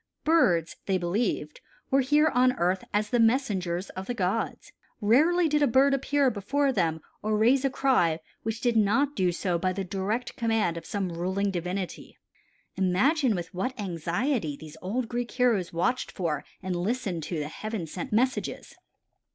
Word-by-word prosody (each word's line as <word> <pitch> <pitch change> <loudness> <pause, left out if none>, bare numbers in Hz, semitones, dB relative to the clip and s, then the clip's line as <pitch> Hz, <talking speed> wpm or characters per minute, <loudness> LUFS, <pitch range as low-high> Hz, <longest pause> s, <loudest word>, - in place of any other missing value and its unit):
Birds, 210 - +3
they 190 -1 +2
believed, 175 -4 -2 0.3
were 270 - +5
here 295 +4 +4
on 250 0 +4
earth 185 -3 0
as 210 +1 0
the 245 - +2
messengers 200 -7 +1
of 190 +1 -7
the 245 - -2
gods. 195 +2 -2 0.3
Rarely 315 +11 +4
did 300 -1 +1
a 290 - +5
bird 270 +3 +4
appear 275 0 +2
before 270 +7 0
them 160 -7 0 0.2
or 215 0 0
raise 250 +5 +4
a 275 - +2
cry 250 -12 +2 0.2
which 225 +2 -4
did 240 -2 +1
not 230 +7 +2
do 185 -2 +2
so 175 0 -1
by 185 +1 0
the 195 +1 -3
direct 200 +6 -3
command 225 -8 +1
of 165 -1 -7
some 195 -3 -2
ruling 190 +4 -1
divinity. 180 +1 -4 0.6
Imagine 225 - +2
with 175 -2 -5
what 235 +8 -3
anxiety 175 - -1
these 155 0 -11
old 230 +6 -2
Greek 240 0 -3
heroes 235 -8 +1
watched 210 +10 -1
for 155 -6 -2 0.2
and 185 -1 -2
listened 190 -2 -2
to 165 +2 -4
the 150 -1 -2
heaven 215 +3 -5
sent 260 - -6
messages. 250 +5 -1
210 Hz, 165 wpm, -27 LUFS, 180-255 Hz, 0.6 s, were